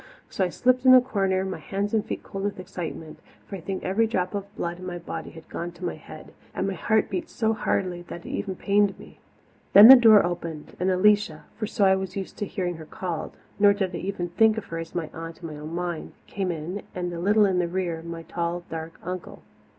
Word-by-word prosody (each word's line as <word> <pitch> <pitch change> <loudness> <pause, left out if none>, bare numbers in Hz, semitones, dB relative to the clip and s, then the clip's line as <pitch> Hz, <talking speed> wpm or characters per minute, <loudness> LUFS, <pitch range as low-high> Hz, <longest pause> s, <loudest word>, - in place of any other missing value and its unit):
So 195 - 0
I 180 - +1
slipped 255 +6 +2
in 255 -1 +9
a - - +10
corner, 195 -6 0
my 190 - -4
hands 200 +2 -3
and 220 -2 +2
feet 220 - -5
cold 195 0 -6
with 205 -2 -2
excitement, 165 -3 -7 0.3
for 200 - -7
I 185 - -7
think 190 +2 -4
every 215 +5 +2
drop 185 -3 -1
of 200 -1 -3
blood 175 +1 -4
in 185 - -8
my 175 -1 -4
body 170 - -6
had 160 -1 -13
gone 175 +1 -5
to 175 +1 -7
my 175 - -1
head, - - -12 0.2
and - - -1
my - - -1
heart - - +1
beat 335 -2 -4
so 220 -1 0
hardly 180 -4 -1
that 170 - -8
it - - -7
even 190 -2 -3
pained 200 0 +2
me. - - -15 0.5
Then 205 +4 +11
the 265 - +14
door 225 -6 +7
opened 165 -3 -5
and 185 - +1
Alicia 205 +3 +3
for 215 - -3
so 210 -2 +1
I 190 0 +5
was 190 -1 -4
used 195 - -5
to 205 - -3
hearing 180 -4 -3
her 160 - -9
called, 175 -2 -5 0.2
nor 200 0 +6
did 190 -3 -2
I - - -3
ever 190 -2 -3
think 220 +5 +3
of 215 - -4
her 165 - -4
as 165 0 -8
my 165 -3 -2
aunt 165 +1 -8
in - - -4
my 150 - -8
own 155 +3 -7
mind 175 -2 -4
came 190 -2 -2
in, 170 +5 -5
and 180 -1 -3
a 170 - -5
little 205 +4 +4
in 185 -2 +1
the 175 - +1
rear 170 -2 -2
my 165 0 -7
tall, 170 +1 -3
dark 160 0 -6
uncle. 180 0 -6
185 Hz, 245 wpm, -25 LUFS, 170-205 Hz, 0.5 s, the